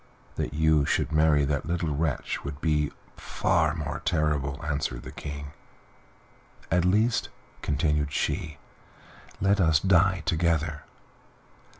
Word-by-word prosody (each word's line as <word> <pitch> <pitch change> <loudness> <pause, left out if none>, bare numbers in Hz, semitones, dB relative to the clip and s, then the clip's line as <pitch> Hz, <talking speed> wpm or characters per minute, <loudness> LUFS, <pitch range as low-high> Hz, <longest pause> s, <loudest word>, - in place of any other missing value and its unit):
"That - - -3
you 80 -1 +3
should - - 0
marry 75 -2 +4
that 70 0 -2
little 85 -3 -1
wretch 75 -2 -2
would 70 0 -6
be 75 -2 +1 0.3
far 85 -4 +1
more 75 -3 -4
terrible," 75 -3 0
answered 70 -5 -2
the - - -8
King. 70 0 -7 1.2
"At 85 +1 +3
least," 105 +5 +2 0.3
continued 75 -1 0
she, 75 +1 -2 0.8
"let 100 +1 +2
us 80 -3 +4
die 95 -1 +3
together." 80 -2 0
75 Hz, 115 wpm, -27 LUFS, 75-85 Hz, 1.2 s, marry